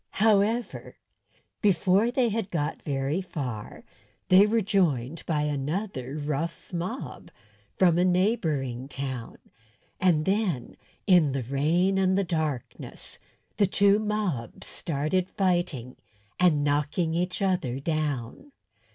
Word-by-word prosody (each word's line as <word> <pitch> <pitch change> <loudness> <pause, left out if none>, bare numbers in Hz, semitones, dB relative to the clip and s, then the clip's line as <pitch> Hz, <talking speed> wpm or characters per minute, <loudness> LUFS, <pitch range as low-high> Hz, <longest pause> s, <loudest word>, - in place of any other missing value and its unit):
However, 220 +3 +1 0.6
before 200 +1 +3
they 245 -1 +2
had 215 -2 -2
got 150 -6 -2
very 140 +4 -1
far 130 - -6 0.5
they 190 +3 +7
were 225 +1 +2
joined 165 - 0
by 150 -3 +1
another 145 - -3
rough 155 +4 -4
mob 180 +9 -5 0.5
from 175 -2 +4
a - - +4
neighbouring 165 - 0
town; 130 -3 -5 0.6
and 165 -5 +3
then, 190 - -1 0.3
in 175 -8 +5
the 135 -2 -2
rain 165 +9 +1
and 190 0 +2
the 200 - +2
darkness, 155 -7 -4 0.4
the 205 -2 +4
two 200 +2 +4
mobs 210 - -3
started 165 +5 -1
fighting 175 - -1 0.4
and 165 -5 +4
knocking 150 +3 0
each 180 +2 -1
other 180 - 0
down. 155 - -3
170 Hz, 115 wpm, -27 LUFS, 140-195 Hz, 0.6 s, they